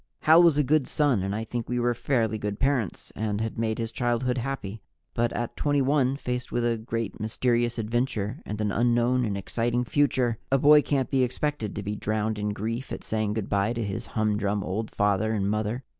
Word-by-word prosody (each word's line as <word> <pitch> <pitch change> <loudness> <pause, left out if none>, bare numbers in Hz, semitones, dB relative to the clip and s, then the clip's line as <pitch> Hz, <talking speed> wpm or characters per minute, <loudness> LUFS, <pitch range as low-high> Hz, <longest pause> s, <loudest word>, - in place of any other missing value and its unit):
Hal 160 +2 +7
was 170 -4 +5
a 150 - +4
good 145 0 +2
son 140 -9 +2
and 100 +2 -2
I 110 - -2
think 115 +1 -5
we 125 0 0
were 120 0 +2
fairly 115 -3 0
good 105 0 -3
parents 130 -8 -1
and 105 -1 -2
had 110 0 -3
made 110 -1 0
his 115 -1 -3
childhood 125 +1 0
happy. 115 -5 -4 0.3
But 120 0 +1
at 120 -1 -3
21, 140 -2 +2
faced 125 -2 -4
with 120 0 0
a 120 -1 +2
great, 115 -1 -4
mysterious 120 +2 0
adventure 115 -2 -2
and 105 +1 -5
an 105 -1 0
unknown 120 +2 +2
and 100 -3 -2
exciting 120 +4 -1
future, 125 -3 +1
a 135 - +5
boy 150 +2 +7
can't 135 -3 -1
be 135 -2 +3
expected 130 -3 -2
to 105 - -4
be 105 +1 -3
drowned 110 +1 -1
in 105 0 -1
grief 115 +5 -4
at - - -5
saying 110 -1 -1
good 110 -3 -2
by 100 +3 +1
to 115 -1 -2
his 105 +3 -4
humdrum 105 -2 +1
old 105 +5 -3
father 105 +2 +1
and 100 -2 0
mother. 110 +4 -2
115 Hz, 205 wpm, -26 LUFS, 105-125 Hz, 0.3 s, Hal